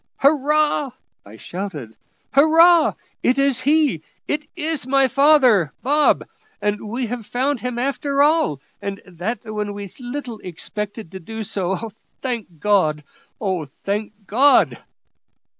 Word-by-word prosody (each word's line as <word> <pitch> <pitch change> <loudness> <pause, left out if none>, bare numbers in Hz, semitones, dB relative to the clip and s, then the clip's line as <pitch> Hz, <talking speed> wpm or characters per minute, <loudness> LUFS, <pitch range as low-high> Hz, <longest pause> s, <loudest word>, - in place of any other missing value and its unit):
"Hurrah!" 295 -1 +2 0.3
I 100 +2 -13
shouted; 150 - -7 0.4
"hurrah! 325 +3 +6 0.3
it 255 - +2
is 275 -2 +2
he 290 - +2 0.3
it 300 0 -2
is 315 -5 -3
my 270 0 +4
father, 260 - +4
Bob; 290 +4 +3 0.3
and 210 0 -2
we 245 +3 -2
have 240 0 -5
found 260 +5 -1
him 250 0 -4
after 275 +2 +1
all, 295 - +2 0.2
and 200 0 -4
that 185 +7 -5
when 210 -1 -4
we 205 0 -6
little 245 -2 -6
expected 205 +3 -6
to 190 - -7
do 220 +5 -6
so. 195 +2 -3 0.3
Thank 230 - -5
God; 155 -6 +2 0.4
oh! 185 -6 -1
thank 200 +9 -4
God!" 265 +9 +4
235 Hz, 125 wpm, -21 LUFS, 200-280 Hz, 0.4 s, hurrah